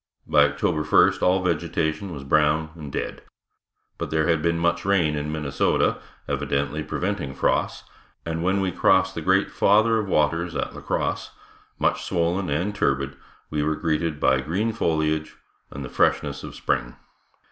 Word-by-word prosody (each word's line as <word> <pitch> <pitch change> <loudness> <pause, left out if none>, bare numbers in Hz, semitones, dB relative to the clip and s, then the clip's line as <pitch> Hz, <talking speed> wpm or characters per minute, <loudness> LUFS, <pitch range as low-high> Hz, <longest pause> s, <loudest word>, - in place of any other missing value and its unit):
By 75 -1 +5
October 75 +3 0
first 75 - +4
all 90 +1 +3
vegetation 85 +2 -1
was 70 -4 -7
brown 75 +3 +2
and 75 -4 -9
dead. - - -4 0.8
But - - -3
there 80 -1 +1
had 80 -2 +2
been 85 +1 +1
much 85 +1 0
rain 90 -6 +2
in 75 +1 -3
Minnesota, 75 -3 0 0.3
evidently 70 +2 -1
preventing 90 -5 -3
frosts, - - 0 0.4
and 80 0 -3
when 95 +3 +1
we 95 -1 0
crossed 95 +1 +3
the 85 - -5
great 95 +4 +2
Father 110 +2 +3
of 105 - -3
Waters 85 +1 +1
at - - -2
La - - -9
Crosse, - - -2 0.5
much - - +1
swollen 85 +2 0
and 85 +8 -1
turbid, 70 -8 0 0.4
we 75 -1 0
were 80 +1 0
greeted 80 -1 -1
by 65 -1 +3
green 95 +11 -1
foliage 80 -6 -1 0.3
and 70 -1 -7
the - - -5
freshness - - 0
of - - -8
spring. - - -2
80 Hz, 160 wpm, -24 LUFS, 75-90 Hz, 0.8 s, By